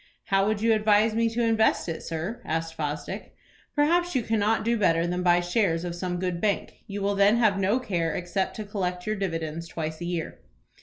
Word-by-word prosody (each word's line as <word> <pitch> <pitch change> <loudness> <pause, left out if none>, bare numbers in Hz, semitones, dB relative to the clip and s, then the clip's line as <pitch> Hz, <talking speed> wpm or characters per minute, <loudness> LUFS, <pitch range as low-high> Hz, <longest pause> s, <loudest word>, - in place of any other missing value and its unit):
"How 195 0 +3
would 215 0 -1
you 225 0 +5
advise 215 0 +3
me 230 +1 +2
to 235 +1 -1
invest 225 -3 +2
it, 165 -1 -4
sir?" 165 +8 -4
asked 165 +1 -2
Fosdick. 150 +6 -5 0.4
"Perhaps 345 +3 +2
you 250 - +2
cannot 220 0 +1
do 235 +1 +2
better 165 -6 +2
than 180 +1 -1
buy 175 -1 +4
shares 175 -2 +1
of 175 - -3
some 180 0 -3
good 180 -1 -2
bank. 205 -2 -1
You 200 -1 -4
will 200 +1 +1
then 200 +3 +4
have 215 -5 +3
no 200 +6 +2
care 170 -9 -1
except 180 +2 -2
to 215 - -4
collect 180 -3 -3
your 215 - -1
dividends 165 -4 -3
twice 160 0 -5
a - - -3
year." 170 -2 -4
195 Hz, 205 wpm, -26 LUFS, 170-220 Hz, 0.4 s, you